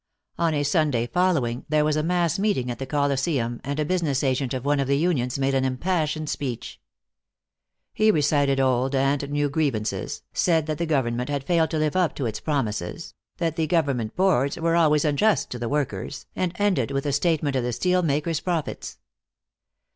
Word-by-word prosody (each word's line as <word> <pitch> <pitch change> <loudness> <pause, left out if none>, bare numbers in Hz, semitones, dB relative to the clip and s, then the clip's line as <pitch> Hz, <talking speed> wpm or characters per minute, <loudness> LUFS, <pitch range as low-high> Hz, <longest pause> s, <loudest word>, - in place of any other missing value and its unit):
On 170 -1 +2
a 145 - +1
Sunday 145 -5 +1
following, 130 -5 0
there 150 0 +3
was 155 -1 +1
a 155 - +1
mass 170 0 0
meeting 195 -13 0
at 120 - -6
the 135 - -4
Colosseum, 135 -4 0
and 140 +2 -3
a 150 - +1
business 155 -6 0
agent 130 -1 0
of 130 0 -3
one 145 0 +2
of 135 - 0
the 140 0 +2
unions 140 -7 0
made 135 0 0
an 135 -1 +2
impassioned 155 +3 -1
speech. 130 -5 -5 1.1
He 215 0 +3
recited 145 -5 +2
old 130 +1 +1
and 140 +1 +1
new 145 0 +1
grievances, 140 -8 -2
said 165 -3 +2
that 155 0 -3
the 170 - -1
government 125 -4 0
had 140 -2 -2
failed 165 0 +2
to 160 - -2
live 155 +1 0
up 180 -3 +1
to 135 - -3
its 110 - -3
promises, 120 - -3 0.2
that 165 -2 -1
the 160 -1 +1
government 140 -9 0
boards 170 -8 +2
were 165 0 +1
always 150 -3 +3
unjust 175 +9 +2
to 125 - -5
the 120 -1 -3
workers, 145 -1 -3
and 180 -2 -1
ended 185 - +1
with 135 0 -2
a 145 - 0
statement 145 -2 +1
of 130 - +1
the 125 - -1
steel 180 +8 +1
makers' 155 0 0
profits. 170 -4 -3
145 Hz, 190 wpm, -24 LUFS, 135-165 Hz, 1.1 s, there